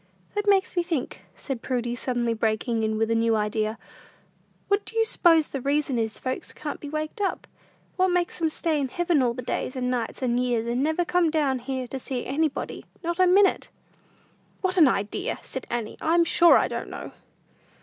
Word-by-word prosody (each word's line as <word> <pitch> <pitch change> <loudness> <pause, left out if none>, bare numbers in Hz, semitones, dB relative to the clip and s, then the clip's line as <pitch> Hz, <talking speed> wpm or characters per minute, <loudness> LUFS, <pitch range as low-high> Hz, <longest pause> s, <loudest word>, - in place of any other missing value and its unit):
"That 415 0 -2
makes 385 -2 +3
me 350 - +3
think," 335 -7 -4
said 265 -5 -5
Prudy, 240 -1 -2
suddenly 240 -1 -1
breaking 225 +1 0
in 220 0 0
with 225 +1 0
a - - +4
new 225 0 +2
idea; 215 +1 -1 0.9
"what 405 +1 +2
do 455 - -8
you 450 - +4
s'pose 330 -7 +4
the 275 - -4
reason 280 -2 0
is 220 -1 -2
folks 255 0 -4
can't 300 -1 -6
be 290 - -7
waked 310 +7 -4
up? 390 - -1 0.5
What 370 0 +4
makes 355 -1 0
'em 325 - +3
stay 310 -1 -1
in 270 - 0
heaven 340 +1 +1
all 240 -2 +1
the 250 - -5
days, 255 - -3
and 250 -1 -1
nights, 245 +1 -3
and 245 -1 +1
years, 240 -2 0
and 240 +2 -1
never 315 +4 +1
come 355 -1 +2
down 290 -5 +1
here 260 0 -4
to 270 - -4
see 255 -1 -4
anybody, 290 +1 -2 0.2
not 340 +2 -2
a 370 - +6
minute?" 385 +2 +4 0.9
"What 375 -2 0
an 320 -5 +8
idea!" 205 -5 -1
said - - -6
Annie. 235 -3 -3
"I'm 340 +2 +4
sure 340 0 +6
I - - +2
don't - - -5
know." - - -7
270 Hz, 200 wpm, -25 LUFS, 240-340 Hz, 0.9 s, an